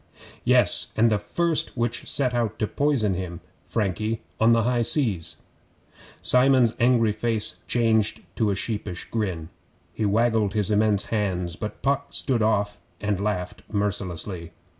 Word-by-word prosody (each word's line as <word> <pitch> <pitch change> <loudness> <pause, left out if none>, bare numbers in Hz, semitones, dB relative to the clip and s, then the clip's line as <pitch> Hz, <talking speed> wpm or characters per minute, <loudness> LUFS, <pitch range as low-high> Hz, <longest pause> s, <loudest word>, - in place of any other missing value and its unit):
'Yes, - - +3
and 115 +1 +4
the 105 - +2
first 160 +9 -1
which 120 0 -1
set 130 -3 +1
out 115 -3 -1
to 110 - 0
poison 130 -5 +1
him 90 -2 -5 0.3
Frankie 110 +1 -1 0.2
on 115 +1 +5
the 115 -1 +4
high 120 +1 +1
seas 115 - 0 0.4
' - - -24 0.2
Simon's 125 -2 +4
angry 120 -2 +4
face 110 0 -1
changed 110 -3 +2
to 110 -2 +1
a 100 - +1
sheepish 100 -3 -4
grin. 90 -8 -2 0.4
He 110 - -1
waggled 110 -1 +2
his 105 -1 0
immense 105 -1 +3
hands, 90 -5 -1
but 105 +3 -7
Puck 140 0 0
stood 125 -4 0
off 105 -1 +1 0.2
and 105 -2 -1
laughed 90 -4 -2
mercilessly. 95 -4 -2
110 Hz, 145 wpm, -25 LUFS, 100-115 Hz, 0.4 s, on